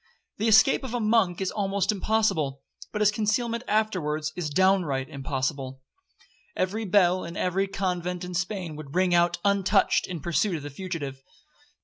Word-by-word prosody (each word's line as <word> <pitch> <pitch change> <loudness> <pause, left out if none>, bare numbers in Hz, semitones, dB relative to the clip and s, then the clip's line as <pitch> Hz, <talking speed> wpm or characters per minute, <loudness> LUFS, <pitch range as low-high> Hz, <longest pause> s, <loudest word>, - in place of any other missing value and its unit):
The 220 - +1
escape 225 +6 +5
of 250 -2 -4
a - - 0
monk 215 -5 +2
is 190 - -1
almost 200 0 0
impossible,—but 205 -5 -2
his 210 - +5
concealment 230 +3 -1
afterwards 155 -8 0
is 175 -4 -3
downright 165 -6 +2
impossible. 135 -1 -4 0.7
Every 210 +4 -1
bell 185 -2 +3
in 170 - -7
every 190 +2 0
convent 180 -2 -3
in 180 0 -6
Spain 180 -2 -3
would 150 0 -9
ring 185 -1 +2
out 175 0 +3
untouched 200 0 +2
in 180 -3 -5
pursuit 170 +4 0
of 150 - -6
the 145 - -7
fugitive. 140 -5 -5
185 Hz, 150 wpm, -26 LUFS, 155-210 Hz, 0.7 s, escape